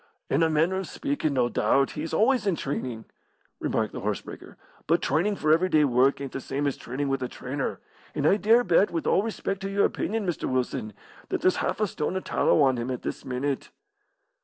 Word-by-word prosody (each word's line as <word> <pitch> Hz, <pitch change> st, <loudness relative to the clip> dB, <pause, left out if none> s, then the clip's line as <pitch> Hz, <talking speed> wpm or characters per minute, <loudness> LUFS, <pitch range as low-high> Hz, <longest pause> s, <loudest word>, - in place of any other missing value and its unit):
"In -, -, +3 dB
a 165 Hz, -, +4 dB
manner 160 Hz, +4 st, +2 dB
of 190 Hz, -, -3 dB
speakin', 280 Hz, -, -2 dB
no 125 Hz, -2 st, +3 dB
doubt, 130 Hz, +4 st, +2 dB
he 150 Hz, -, -5 dB
is 165 Hz, -, -4 dB
always 240 Hz, 0 st, +2 dB
in 190 Hz, -, +2 dB
trainin'," 130 Hz, -6 st, -4 dB, 0.5 s
remarked 110 Hz, -1 st, -1 dB
the -, -, -5 dB
horse 105 Hz, -1 st, -1 dB
breaker. -, -, -11 dB, 0.3 s
"But -, -, +3 dB
trainin' 175 Hz, +9 st, +1 dB
for 155 Hz, -4 st, +3 dB
everyday 165 Hz, -2 st, +3 dB
work 130 Hz, 0 st, +3 dB
ain't 140 Hz, -1 st, -5 dB
the 135 Hz, -, -5 dB
same 140 Hz, +3 st, -3 dB
as 140 Hz, -, 0 dB
trainin' 135 Hz, +4 st, -4 dB
with 135 Hz, -1 st, -1 dB
a 125 Hz, -, -1 dB
trainer; 130 Hz, +3 st, -4 dB, 0.4 s
and 145 Hz, -1 st, -1 dB
I 195 Hz, -, +5 dB
dare 225 Hz, +3 st, +4 dB
bet, 195 Hz, 0 st, +4 dB
with 165 Hz, -, -3 dB
all -, -, +3 dB
respec' 200 Hz, -3 st, -3 dB
to 195 Hz, 0 st, -4 dB
your 200 Hz, 0 st, +2 dB
opinion, 220 Hz, -1 st, -2 dB
Mr. 175 Hz, -4 st, -2 dB
Wilson, 125 Hz, -4 st, -2 dB, 0.4 s
that -, -, -1 dB
there's 185 Hz, -, +3 dB
half -, -, -1 dB
a 215 Hz, -, +3 dB
stone 170 Hz, -2 st, -3 dB
of 190 Hz, -, -2 dB
tallow 150 Hz, -, +3 dB
on 130 Hz, -2 st, +3 dB
him 120 Hz, +2 st, -3 dB
at 125 Hz, -2 st, -4 dB
this -, -, -4 dB
minute." 130 Hz, +2 st, -3 dB
150 Hz, 220 wpm, -26 LUFS, 130-190 Hz, 0.5 s, I